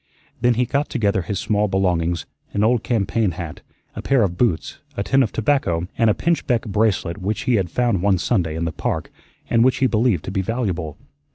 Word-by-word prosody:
Then 120 0 +3
he 125 +2 +2
got 140 +4 -1
together 100 -7 +1
his 95 +4 -3
small 105 +1 +1
belongings 90 -3 0 0.3
an 100 - +1
old 115 +1 +3
campaign 110 -4 0
hat, 80 -1 -7 0.3
a - - -5
pair 135 -4 +3
of 90 -3 -1
boots, 95 -7 0 0.2
a 100 - 0
tin 135 +5 +3
of 115 -6 +1
tobacco, 100 - 0
and 115 -1 +3
a 105 - +3
pinchbeck 150 -8 0
bracelet 105 -4 0
which 100 +3 -2
he 125 - +1
had 95 -3 -1
found 120 -1 +1
one 100 -1 +3
Sunday 90 -5 0
in 85 +1 -2
the 80 - -1
Park, 75 - -3 0.4
and 115 -1 +3
which 130 +1 +3
he 135 - +2
believed 110 -7 +1
to - - -4
be 95 0 0
valuable. 95 - -2
105 Hz, 205 wpm, -21 LUFS, 90-120 Hz, 0.4 s, Then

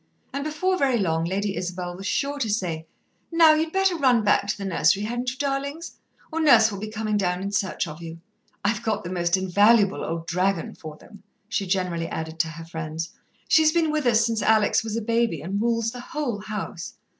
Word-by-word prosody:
And 280 +1 -2
before 370 +5 -1
very 265 -3 +2
long 165 -5 0
Lady 195 +3 -1
Isabel 180 -1 -4
was 195 +2 -6
sure 285 0 -1
to 230 -5 -1
say: 170 -6 -2 0.4
"Now, 330 -2 +7
you'd 315 +1 0
better 385 -1 +2
run 255 -7 +3
back 205 -1 +3
to - - -1
the 200 - -5
nursery, 195 +2 +2
hadn't 240 +3 -2
you, 255 - -7
darlings? 280 +4 -3 0.4
or 325 - -2
Nurse 230 -8 +6
will 200 - -6
be 215 - -5
comin' 215 -1 -2
down 180 -2 0
in 200 - -3
search 200 -3 -1
of 155 +2 -9
you. 165 0 -8 0.5
I've 210 +1 +1
got 220 -2 -1
the 175 - -6
most 175 0 +1
invaluable 200 +2 +3
old 165 0 -4
dragon 180 +1 0
for 155 -1 -10
them," 205 +4 -16 0.3
she 195 - -2
generally 180 -3 -1
added 160 0 -5
to 165 - +2
her 165 +1 -8
friends. 160 0 -5 0.4
"She's 315 -1 +5
been 330 -2 +2
with 305 -4 0
us 230 -1 +4
since 225 -2 -1
Alex 220 0 +3
was 220 0 -3
a 230 - -3
baby, 230 -6 +1
and 195 +5 -2
rules 230 -1 +1
the 250 - -8
whole 285 -6 -3
house." 210 -4 -6
210 Hz, 210 wpm, -24 LUFS, 180-250 Hz, 0.5 s, Now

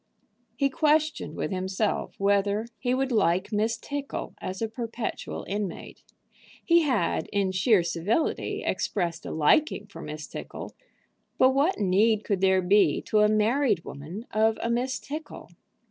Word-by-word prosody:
He 275 +3 +1
questioned 305 - +1
with - - -3
himself 190 +3 -1
whether 200 +2 +2
he 250 0 0
would 270 0 -1
like 190 -3 +2
Miss 220 +2 0
Tickle 285 +3 -5
as 185 0 -5
a 225 - -1
perpetual 230 0 -5
inmate. 200 -3 -5 0.6
He 340 0 +5
had, 250 - 0
in 200 -2 +1
sheer 190 0 +3
civility, 175 - -1
expressed 170 -4 -2
a - - -5
liking 205 - +2
for 205 - -11
Miss 150 0 -6
Tickle, - - -8 0.6
but 260 - +5
what 290 +8 +2
need 210 +3 +3
could 200 -3 -1
there 190 -1 +3
be 200 +3 +4
to 215 - +1
a 210 0 +5
married 215 - +2
woman 165 +11 -8
of 220 0 +2
a 235 - 0
Miss 255 +2 0
Tickle? 300 +2 -8
215 Hz, 145 wpm, -27 LUFS, 190-255 Hz, 0.6 s, He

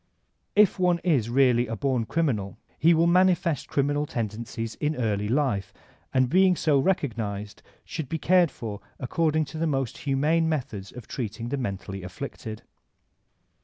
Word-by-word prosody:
If 205 -2 +5
one 180 -1 +3
is 140 -11 +2
really 125 -1 +3
a 115 - -3
bom 125 -1 0
criminal 110 - -1 0.2
he 165 +3 +5
will 165 +1 +4
manifest 180 -2 +3
criminal 145 +1 0
tendencies 115 0 -4
in 150 +1 0
early 105 -5 -1
life, 120 -6 0 0.4
and 130 -1 +3
being 185 +5 +4
so 150 -4 +2
recognized 110 - -2 0.2
should 150 -5 -5
be 165 - -1
cared 180 +1 +4
for 110 -5 -7 0.2
according 155 +4 +1
to 160 - -5
the 165 - +1
most 135 -5 -2
humane 150 +4 +1
methods 125 -11 -3
of 125 -3 -10
treating 115 -1 -4
the 140 - -1
mentally 100 -5 -4
afflicted. 110 +3 -7
135 Hz, 150 wpm, -26 LUFS, 110-160 Hz, 0.4 s, If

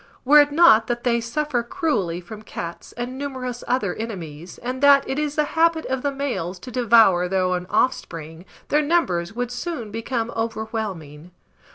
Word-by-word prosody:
Were 295 +3 +8
it 290 0 +1
not 290 -9 +6
that 240 0 -2
they 235 -1 +1
suffer 250 +2 -1
cruelly 235 - -1
from 215 +4 -10
cats, 170 -5 -7
and 245 +2 -5
numerous 255 -3 -5
other 240 -7 0
enemies, 175 -7 -7
and 255 +2 -5
that 280 -1 +6
it 270 - -2
is 300 -1 -2
the 300 - +2
habit 325 0 +2
of 260 0 -2
the 285 - 0
males 215 -11 -3
to 250 - -9
devour 225 -7 +4
their 190 0 0
own 180 -1 -1
offspring, 165 -9 -2 0.2
their 295 - +3
numbers 210 - 0
would 245 0 -3
soon 245 - -5
become 230 +1 -3
overwhelming. 220 -9 -4
235 Hz, 170 wpm, -22 LUFS, 185-275 Hz, 0.2 s, Were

